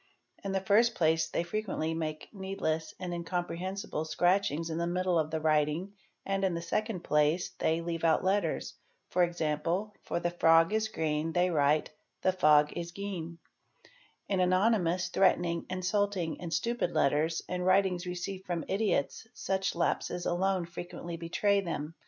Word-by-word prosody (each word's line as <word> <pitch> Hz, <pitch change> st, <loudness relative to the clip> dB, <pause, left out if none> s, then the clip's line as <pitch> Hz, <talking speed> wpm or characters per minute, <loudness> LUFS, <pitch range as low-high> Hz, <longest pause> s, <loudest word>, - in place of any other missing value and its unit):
In 195 Hz, -, -3 dB
the 195 Hz, -, +1 dB
first 220 Hz, +5 st, +3 dB
place 160 Hz, -1 st, +2 dB
they -, -, -1 dB
frequently 175 Hz, -4 st, -2 dB
make 155 Hz, -1 st, -4 dB
needless 165 Hz, -5 st, -3 dB
and 180 Hz, -1 st, -4 dB
incomprehensible 175 Hz, 0 st, -3 dB
scratchings 165 Hz, -1 st, +1 dB
in 160 Hz, -, -2 dB
the 170 Hz, -, 0 dB
middle 180 Hz, 0 st, +1 dB
of 155 Hz, -1 st, 0 dB
the 160 Hz, 0 st, -2 dB
writing 155 Hz, +4 st, +1 dB, 0.3 s
and 195 Hz, 0 st, -1 dB
in 185 Hz, -3 st, +1 dB
the 170 Hz, -, -3 dB
second 210 Hz, +2 st, -2 dB
place 150 Hz, +4 st, +2 dB
they 160 Hz, +1 st, +1 dB
leave 165 Hz, -1 st, -4 dB
out 160 Hz, -1 st, +3 dB
letters, 190 Hz, -3 st, 0 dB, 0.4 s
e.g., 175 Hz, -4 st, +1 dB, 0.5 s
for -, -, -2 dB
'the 175 Hz, 0 st, -2 dB
frog 165 Hz, +3 st, +5 dB
is 220 Hz, 0 st, +1 dB
green" 160 Hz, -5 st, -2 dB
they 180 Hz, 0 st, +2 dB
write 150 Hz, -1 st, +2 dB, 0.3 s
"the 185 Hz, -, +4 dB
fog 150 Hz, -4 st, +4 dB
is 170 Hz, 0 st, -4 dB
geen."'"8 170 Hz, -3 st, -9 dB, 0.4 s
In 195 Hz, -2 st, 0 dB
anonymous, 185 Hz, -1 st, +2 dB
threatening, 175 Hz, -2 st, +2 dB
insulting, 185 Hz, -2 st, -1 dB
and 170 Hz, -2 st, -5 dB
stupid 235 Hz, -3 st, -1 dB
letters 155 Hz, +4 st, +1 dB
and 180 Hz, 0 st, -2 dB
writings 185 Hz, -1 st, +2 dB
received 185 Hz, +2 st, -5 dB
from 175 Hz, -2 st, -2 dB
idiots 200 Hz, -1 st, 0 dB
such 195 Hz, -4 st, -1 dB
lapses 175 Hz, +1 st, -1 dB
alone 185 Hz, 0 st, +1 dB
frequently 170 Hz, 0 st, -7 dB
betray 200 Hz, +4 st, +1 dB
them. 165 Hz, -4 st, -4 dB
175 Hz, 150 wpm, -30 LUFS, 165-190 Hz, 0.5 s, frog